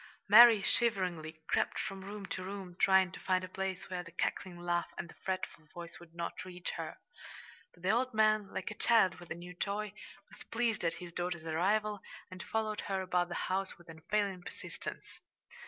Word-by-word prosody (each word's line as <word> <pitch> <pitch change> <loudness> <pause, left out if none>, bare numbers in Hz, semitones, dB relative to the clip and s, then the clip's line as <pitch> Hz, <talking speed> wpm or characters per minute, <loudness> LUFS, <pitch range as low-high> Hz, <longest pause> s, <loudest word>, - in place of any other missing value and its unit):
Mary, 220 0 +10
shiveringly, 180 -10 0
crept - - +1
from 195 0 -4
room 200 +1 -6
to 185 0 -4
room, 190 -2 -6
trying 190 -1 +5
to - - -8
find 185 -1 +1
a - - -4
place 190 0 -3
where 180 -1 -3
the 170 -1 -11
cackling 180 +2 -2
laugh 175 0 0
and 180 - -4
the - - -13
fretful 185 -4 -3
voice 170 -1 -8
would 170 -1 -15
not 170 +1 -4
reach 180 -1 -5
her. - - -5 0.8
But 175 - -20
the 190 - +4
old 255 +3 +2
man, 215 -2 +3
like - - -3
a - - -3
child 215 -4 +4
with 175 - -12
a - - -3
new 175 +1 -9
toy, 200 +3 -2 0.3
was - - -14
pleased 230 -3 0
at 165 -1 +1
his 175 0 -9
daughter's 175 -2 -3
arrival, 205 +6 +1 0.3
and 185 0 -7
followed 215 -1 -1
her 190 -1 0
about 180 -1 +1
the 175 - -4
house 190 +1 -1
with 175 -1 -17
unfailing 190 +4 -1
persistence. 180 - -8
185 Hz, 190 wpm, -33 LUFS, 175-205 Hz, 0.8 s, Mary